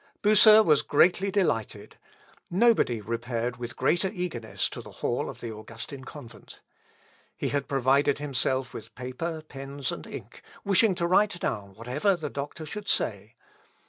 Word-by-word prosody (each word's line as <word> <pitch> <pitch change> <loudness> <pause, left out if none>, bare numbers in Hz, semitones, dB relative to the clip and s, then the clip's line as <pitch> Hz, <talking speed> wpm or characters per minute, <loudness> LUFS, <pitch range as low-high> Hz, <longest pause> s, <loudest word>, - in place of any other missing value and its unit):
Bucer 215 +1 +8
was 150 -7 +4
greatly 180 +6 +3
delighted; 180 - -1 0.5
nobody 195 - +3
repaired 115 +2 -3
with 120 +1 -6
greater 180 +2 +2
eagerness 170 - -3
to - - -8
the - - -13
hall - - 0
of - - -10
the 115 - -5
Augustin 115 +5 -9
convent. 140 -6 -12 0.8
He - - -2
had 140 -1 -1
provided 135 +1 +2
himself 130 -2 -1
with - - -10
paper, 155 +6 -5
pens, 135 -1 -5
and - - -7
ink, - - -9 0.2
wishing 200 0 +4
to 170 - -1
write 190 +1 +3
down 100 - -3
whatever 130 - 0
the 155 -4 -5
doctor 145 +3 -6
should 210 +5 -7
say. 105 - -1
140 Hz, 145 wpm, -27 LUFS, 120-180 Hz, 0.8 s, Bucer